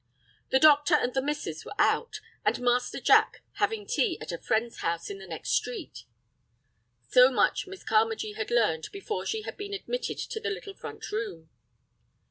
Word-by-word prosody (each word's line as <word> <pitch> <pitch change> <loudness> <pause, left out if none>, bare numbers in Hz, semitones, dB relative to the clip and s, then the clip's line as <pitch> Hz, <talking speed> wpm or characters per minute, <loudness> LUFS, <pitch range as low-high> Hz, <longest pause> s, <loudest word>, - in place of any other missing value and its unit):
The - - +4
doctor 295 +2 +6
and 250 -4 +1
the 265 - +1
"missus" 295 +2 -3
were - - -9
out, 475 - +1 0.2
and - - +1
Master 245 0 +1
Jack - - +4
having 440 -2 0
tea 460 -5 +1
at - - -6
a 170 - -5
friend's 225 +2 -1
house 170 +2 -2
in 195 - -7
the 190 - -10
next 165 -2 -5
street. 440 -10 -2 1.1
So 250 +1 +8
much 265 - +1
Miss 380 0 -10
Carmagee 220 -1 +1
had 220 0 -4
learned 215 -10 +1
before 400 +2 -4
she 440 -1 -2
had - - -7
been 405 0 -5
admitted - - -3
to 445 - -4
the 445 0 -2
little 410 -1 -6
front - - -8
room. 175 - -4
270 Hz, 175 wpm, -28 LUFS, -, 1.1 s, So